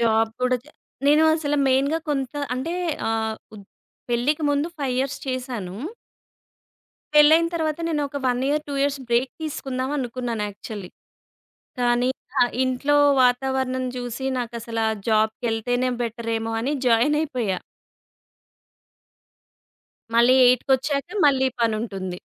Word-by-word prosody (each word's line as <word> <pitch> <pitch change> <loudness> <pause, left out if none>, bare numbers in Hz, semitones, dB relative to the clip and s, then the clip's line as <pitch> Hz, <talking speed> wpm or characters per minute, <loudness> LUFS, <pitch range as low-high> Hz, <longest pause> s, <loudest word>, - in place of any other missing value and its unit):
Job 225 -1 +2
కూడా 250 0 +3
చె 300 - -18 0.4
నేను 300 +2 +5
అసలు 295 -2 -1
మెయిన్‌గా 275 +5 +2
కొంత 270 -4 -1 0.2
అంటే 265 +7 -3 0.4
ఆహ్, 220 -1 -1 0.2
ఉద్ 200 -2 -11 0.4
పెళ్ళికి 255 +6 0
ముందు 290 +3 0
5 270 -3 -1
ఇయర్స్ 270 +1 -1
చేశాను. 245 -8 -4 1.4
పెళ్లైన 310 +3 +7
తరువాత, 315 -2 -1
నేను 305 -3 0
ఒక 285 - -5
1 245 -1 +1
ఇయర్, 300 +1 +1
2 285 - -3
ఇయర్స్ 280 0 +1
బ్రేక్ 240 +2 +2
తీసుకుందాం 265 -4 -3
అనుకున్నాను 245 -3 -3
యాక్చువలీ. 205 -1 -8 0.9
కానీ, 245 +1 +2 0.2
ఇంకా 270 - -3 0.2
ఇంట్లో 260 +3 +1 0.3
వాతావరణం 260 +1 +1
చూసి 245 +1 -4
నాకసల 235 -1 -5
ఆ 220 - -1
జాబ్‌కెళ్తేనే 225 +3 +1
బెటరేమో 225 -1 -3
అని 270 +5 -1
జాయినయిపోయా. 245 -4 +1 2.6
మళ్ళీ 240 +2 +6
ఎయిట్కొచ్చాక 265 +4 +2 0.2
మళ్ళీ 265 -2 +3
పనుంటుంది. 210 -5 -2
255 Hz, 115 wpm, -23 LUFS, 230-280 Hz, 2.6 s, పెళ్లైన